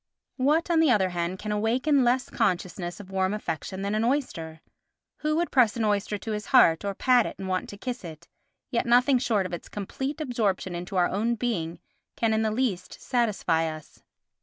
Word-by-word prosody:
What, 300 +6 +2
on 330 - +4
the 320 -2 +4
other 200 -6 +3
hand, 175 +1 -2
can 210 +2 -5
awaken 250 +7 +2
less 250 +1 +2
consciousness 180 -4 -1
of 195 -2 -11
warm 190 +1 0
affection 190 0 -4
than 200 +1 -1
an 215 +1 +1
oyster? 170 - -2 0.6
Who 305 0 -1
would 340 +2 0
press 240 -5 +4
an 230 - 0
oyster 205 0 0
to 220 - -6
his 210 0 -4
heart, 170 -11 +5
or 200 -1 -2
pat 250 0 +3
it - - -7
and 190 - -6
want 185 -1 -2
to 205 - -9
kiss 250 +2 -5
it? 165 0 -10 0.4
Yet 235 -1 0
nothing 250 +2 +4
short 215 -6 +1
of 185 - -6
its 175 - -6
complete 265 +9 -4
absorption 220 - -1
into 175 +3 -6
our 175 -1 +4
own 225 +5 0
being 200 -9 -2 0.4
can 225 -1 +1
in 220 - +2
the 220 - +1
least 215 -5 -2
satisfy 210 -10 0
us. 155 -1 -12
210 Hz, 200 wpm, -26 LUFS, 185-250 Hz, 0.6 s, heart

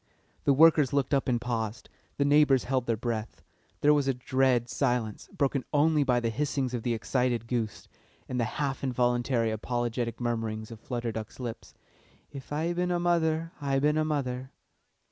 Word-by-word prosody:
The 140 - +5
workers 155 -1 +5
looked 140 -1 +1
up 135 - +2
and 120 -2 +2
paused, 115 -1 -3 0.3
the 140 - +2
neighbours 145 -2 +5
held 130 -2 -1
their 115 -1 +1
breath; 115 -1 -4 0.4
there 150 +1 +6
was 145 -2 +1
a 135 - +1
dread 125 -1 +1
silence, 120 -5 -1
broken 135 -1 0
only 150 0 +3
by 125 -3 +2
the 115 -1 -1
hissings 135 0 -1
of 120 - -2
the 120 0 0
excited 120 +1 0
goose, 115 -3 -3 0.4
and 125 - -3
the 120 - +2
half 140 -2 -2
involuntary 120 -2 +1
apologetic 120 +1 -2
murmurings 115 -2 -3
of 115 - -9
Flutter 120 -1 -3
Duck's 110 +2 -7
lips: 120 -3 -7 0.6
"If 135 -1 -10
I 160 +4 0
bin 180 +1 -1
a 175 -1 +1
mother, 165 -2 +1
I 140 -1 +1
bin 150 +2 +2
a 155 - +2
mother." 130 -4 -2
125 Hz, 175 wpm, -28 LUFS, 120-145 Hz, 0.6 s, there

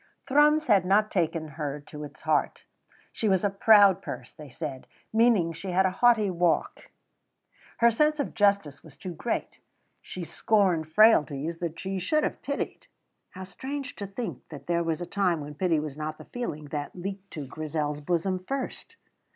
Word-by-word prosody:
Thrums 300 +2 +4
had 205 -8 +4
not 205 +3 +2
taken 165 -3 0
her 150 -2 -4
to 150 +1 -9
its 145 0 -11
heart. - - 0 0.5
She 220 - 0
was 190 -1 +2
a 205 - +2
proud 200 -2 +6
purse, - - -7
they 150 -3 -11
said, 135 -1 -6 0.3
meaning 225 -7 +4
that 165 - -8
she 195 - -6
had 185 +2 +3
a 190 - +2
haughty 225 -5 +5
walk. 175 -1 0 0.9
Her 235 0 +5
sense 300 +6 +2
of 285 - -2
justice 200 -9 +1
was 155 -4 -16
too 180 - -6
great. 230 +8 -3 0.4
She 185 - -7
scorned 170 -2 +1
frailties 165 -6 +4
that 165 -2 -4
she 190 0 -3
should 305 - +1
have - - -2
pitied. 280 +1 -4 0.4
(How 190 -1 -9
strange 265 +9 -6
to 200 - -5
think 220 +4 -5
that 140 -3 -10
there 170 0 +1
was 165 0 -2
a - - -3
time 180 -3 0
when 145 0 -7
pity 165 +1 +1
was 150 -2 -5
not 155 0 -5
the - - -12
feeling 155 -12 -5
that 145 0 -5
leaped 195 +2 -6
to 150 -3 -5
Grizel's 150 +1 -3
bosom 180 +4 0
first!) 270 +2 -5
180 Hz, 180 wpm, -27 LUFS, 155-210 Hz, 0.9 s, proud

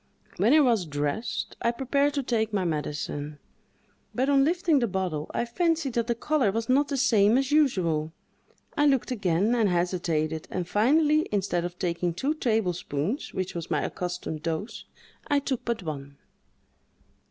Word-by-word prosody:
When 210 +7 +3
I 310 +1 +7
was 230 - +2
dressed, 145 +10 -3
I 235 - +2
prepared 280 +4 0
to 280 - 0
take 225 -3 0
my 195 -3 0
medicine, 150 -1 -3 0.8
but 260 +3 +1
on 275 -1 +5
lifting 335 -1 +2
the 240 - +1
bottle, 180 -6 -3
I - - -1
fancied 325 +1 0
that 235 -1 0
the 235 - 0
color 270 -4 +1
was 225 +2 -2
not 280 +3 +3
the 280 - -2
same 225 -3 +4
as 270 +1 0
usual. 175 - +2 0.6
I 295 0 +3
looked 270 -3 +1
again, 200 -1 +1
and 225 -4 +2
hesitated, 170 -3 -1
and 180 -2 -3
finally, 300 - +3
instead 190 -4 0
of 175 0 -6
taking 175 -1 -1
two 275 - 0
tablespoonfuls, 215 - -2
which 185 -1 -2
was 170 -1 -5
my 155 -4 0
accustomed 180 -3 -4
dose, 200 +8 -4 0.4
I 290 - +2
took 275 -3 -2
but 235 -4 -2
one. 140 -3 -6
215 Hz, 165 wpm, -27 LUFS, 170-270 Hz, 0.8 s, I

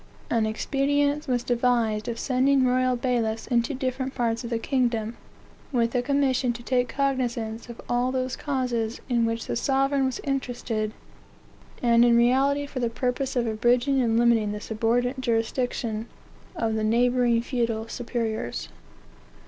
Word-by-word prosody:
An 225 -2 +2
expedient 285 +5 0
was 245 -2 0
devised 235 -3 +1
of 235 -1 -3
sending 265 +1 +2
royal 255 0 +2
bailiffs 235 -3 -1
into 240 +2 0
different 260 0 -3
parts 230 0 0
of 235 - -5
the 235 - 0
kingdom, 235 -3 0 0.6
with 235 -3 +1
a 250 - +2
commission 265 -2 +1
to 240 0 -9
take 250 -1 +1
cognizance 245 -5 -2
of 235 - -9
all 245 +1 +1
those 255 0 -2
causes 245 -5 -2
in 235 -2 +2
which 230 0 -2
the - - -3
sovereign 270 +2 +1
was 260 - -3
interested, 245 -5 -2 0.9
and 235 -1 +5
in 235 -1 +5
reality 270 +4 +3
for 280 -2 -6
the 240 -2 0
purpose 255 +3 -2
of 245 -1 +1
abridging 240 +4 +2
and 230 -2 +2
limiting 230 -3 +3
the 210 - -4
subordinate 240 +4 0
jurisdiction 230 -1 -1 0.5
of 225 -8 -1
the 220 0 -1
neighboring 240 +1 +3
feudal 230 -2 -2
superiors. 230 - -3
245 Hz, 150 wpm, -25 LUFS, 230-260 Hz, 0.9 s, and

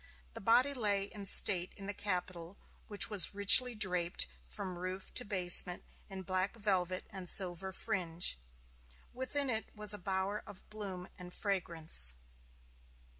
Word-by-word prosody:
The - - -10
body 245 +7 +1
lay 205 -6 -2
in 200 0 -7
state 185 -2 +7
in 195 - -10
the 205 - -6
Capitol, 180 -2 -6 0.3
which 205 0 +2
was 200 -1 0
richly 230 +5 +7
draped 180 -4 -2 0.2
from 185 -4 -8
roof 185 +1 -7
to - - -2
basement 180 -2 +3 0.3
in 190 -1 -9
black 185 +3 -3
velvet 185 -4 -3
and 190 -3 -4
silver 190 -1 +3
fringe. 175 - -3 0.7
Within 265 +3 -4
it 225 -3 -4
was 210 -1 -2
a 210 - -8
bower 190 +2 -4
of 200 -2 -11
bloom 195 -4 -8
and 180 0 -12
fragrance. 165 - -3
190 Hz, 140 wpm, -32 LUFS, 180-210 Hz, 0.7 s, state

